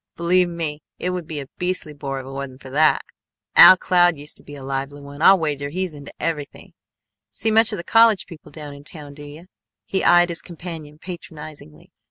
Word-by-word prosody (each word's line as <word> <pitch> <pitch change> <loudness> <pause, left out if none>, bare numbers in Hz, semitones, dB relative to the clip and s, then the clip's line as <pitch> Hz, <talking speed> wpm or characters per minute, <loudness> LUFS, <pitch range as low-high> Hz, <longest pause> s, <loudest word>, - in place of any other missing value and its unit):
Believe 180 +1 +2
me, 160 -3 -4 0.2
it 180 - -2
would 180 -3 -4
be 155 -3 -5
a 140 - -6
beastly 180 -4 -2
bore 135 -2 -5
if 130 - -9
it - - -9
wasn't 135 -1 -7
for 130 - -10
that. 155 +3 +3 0.5
Al 185 - +10
Cloud 175 -3 +3
used 145 +1 -8
to - - -11
be 145 - -11
a 140 - -10
lively 135 +1 -4
one. 140 +1 -11
I'll 195 +3 +7
wager 145 -4 -2
he's 185 +2 -3
into 145 -1 -10
everything. 150 -4 -4 0.6
See 220 - -1
much 225 +1 +4
of 210 - -3
the 170 - -6
college 225 -1 +4
people 165 -3 -13
down 150 -2 -9
in 140 0 -12
town 145 -1 -10
do 145 +1 -11
you?" 150 +4 -11 0.4
He 190 - -1
eyed 175 0 +5
his 170 - -5
companion 165 -3 -9
patronizingly. 155 - -10
155 Hz, 210 wpm, -22 LUFS, 145-175 Hz, 0.6 s, Al